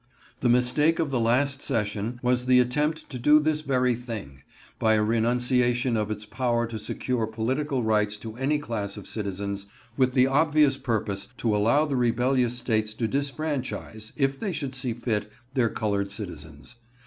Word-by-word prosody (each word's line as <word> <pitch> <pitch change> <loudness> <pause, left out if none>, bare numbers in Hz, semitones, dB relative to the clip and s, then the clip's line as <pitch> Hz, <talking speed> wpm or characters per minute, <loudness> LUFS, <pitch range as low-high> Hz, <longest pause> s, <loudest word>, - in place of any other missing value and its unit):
The 125 - +1
mistake 125 +7 +3
of 160 -4 -1
the 130 - +1
last 135 +4 +1
session 110 -1 -2
was 125 0 +1
the 125 0 +6
attempt 150 +6 0
to 125 - -5
do 150 +5 +6
this 155 0 0
very 125 -4 +2
thing, 110 - -7 0.4
by 110 0 +4
a 105 - +2
renunciation 120 +2 +2
of 105 -1 -1
its 105 0 -4
power 120 +2 0
to 115 -1 -6
secure 115 +2 -2
political 130 +5 -1
rights 105 -1 +1
to 110 +1 -8
any 135 +4 +1
class 110 -8 -4
of 105 - -9
citizens, 100 -1 -4 0.3
with 130 -2 +3
the 130 -1 +6
obvious 145 0 +3
purpose 110 -6 -2
to 110 -3 +1
allow 115 +9 +3
the 145 -3 -2
rebellious 125 0 +2
States 110 -3 -1
to 115 0 -1
disfranchise, 140 -5 -3
if 135 -2 0
they 205 - -2
should 140 -5 -3
see 125 -2 -2
fit, 105 -3 -2 0.2
their 125 -4 +2
colored 100 -2 -1
citizens. 90 0 -9
120 Hz, 170 wpm, -26 LUFS, 110-135 Hz, 0.4 s, the